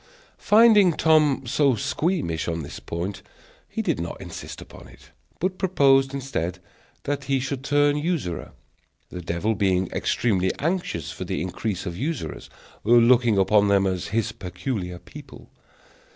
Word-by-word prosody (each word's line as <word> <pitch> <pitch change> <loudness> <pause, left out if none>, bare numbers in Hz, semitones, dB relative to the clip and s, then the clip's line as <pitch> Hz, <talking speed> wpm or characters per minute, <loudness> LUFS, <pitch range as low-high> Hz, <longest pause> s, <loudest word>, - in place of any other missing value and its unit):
Finding 210 -4 +6
Tom 155 -4 +3
so 135 +2 +2
squeamish 130 - -1
on 85 -1 -2
this 70 - -8
point, 90 +4 -5 0.5
he - - -3
did - - 0
not 85 0 -5
insist - - -8
upon - - -13
it, - - -18 0.3
but 185 +1 -2
proposed, 135 -8 +3
instead, 125 -11 -3 0.5
that 145 0 -3
he 135 -1 +1
should 135 0 -4
turn 145 +1 +3
usurer; 150 - -3 0.6
the 90 - -7
devil 85 +6 -1
being 95 -3 0
extremely 95 -6 0
anxious 165 - -2
for - - -6
the - - -3
increase 95 +2 -3
of 85 -3 -4
usurers, 150 - -4 0.3
looking 120 0 +5
upon 100 +1 +4
them 100 -1 +3
as 95 -2 -2
his 110 0 -1
peculiar 90 -2 -5
people. - - -13
115 Hz, 140 wpm, -24 LUFS, 90-145 Hz, 0.6 s, Finding